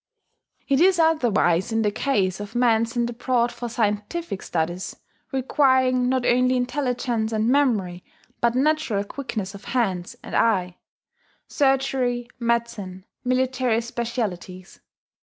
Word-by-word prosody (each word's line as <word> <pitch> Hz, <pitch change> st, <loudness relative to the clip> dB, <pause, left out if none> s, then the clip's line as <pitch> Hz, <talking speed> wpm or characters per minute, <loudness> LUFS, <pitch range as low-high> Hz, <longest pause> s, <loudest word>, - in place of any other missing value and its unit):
It 275 Hz, +1 st, +2 dB
is 370 Hz, 0 st, +5 dB
otherwise 240 Hz, -, +2 dB
in 225 Hz, 0 st, +1 dB
the 210 Hz, -, +1 dB
case 205 Hz, -6 st, 0 dB
of 205 Hz, +3 st, -8 dB
men 230 Hz, -2 st, +3 dB
sent 235 Hz, +1 st, -1 dB
abroad 240 Hz, 0 st, 0 dB
for 240 Hz, -, -6 dB
scientific 210 Hz, -, -2 dB
studies 175 Hz, +2 st, -3 dB, 0.4 s
requiring, 260 Hz, -2 st, +2 dB
not 260 Hz, -1 st, 0 dB
only 250 Hz, +1 st, +3 dB
intelligence 245 Hz, -3 st, -1 dB
and 220 Hz, 0 st, 0 dB
memory, 215 Hz, -11 st, +1 dB, 0.4 s
but 235 Hz, 0 st, +2 dB
natural 275 Hz, -7 st, +1 dB
quickness 215 Hz, -4 st, -5 dB
of 200 Hz, -, -11 dB
hand 195 Hz, -8 st, -1 dB
and -, -, -9 dB
eye, 185 Hz, -6 st, +1 dB, 0.7 s
surgery, 265 Hz, -3 st, +1 dB
medicine, 230 Hz, -6 st, -2 dB, 0.2 s
military 255 Hz, -2 st, +1 dB
specialities. 220 Hz, -6 st, -5 dB
235 Hz, 120 wpm, -23 LUFS, 205-255 Hz, 0.7 s, is